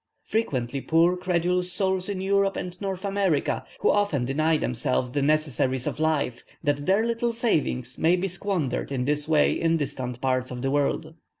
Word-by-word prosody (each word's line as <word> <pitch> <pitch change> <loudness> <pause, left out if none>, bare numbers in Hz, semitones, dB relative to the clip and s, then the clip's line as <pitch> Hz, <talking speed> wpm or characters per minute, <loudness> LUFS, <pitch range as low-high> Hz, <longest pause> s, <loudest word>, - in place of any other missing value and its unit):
Frequently 135 - -1
poor 165 +4 +3
credulous 180 0 0
souls 190 0 0
in 195 -2 -3
Europe 195 0 +2
and 180 -1 -5
North 195 -1 -3
America, 195 -6 0 0.2
who - - +4
often 200 -11 +1
deny 155 +5 +2
themselves 125 -1 -1
the 145 - 0
necessaries 135 -4 +1
of - - -3
life, 155 -6 0 0.2
that 145 0 0
their 200 +4 +3
little 235 0 0
savings 140 - -1
may 170 +2 +4
be 185 +2 -1
squandered 180 -7 -2
in 125 -2 -1
this 150 +1 0
way 155 -2 +4
in 165 0 +1
distant 130 -4 -4
parts 130 -1 0
of 125 0 -6
the 135 - 0
world. 145 +2 0
160 Hz, 175 wpm, -25 LUFS, 135-190 Hz, 0.2 s, who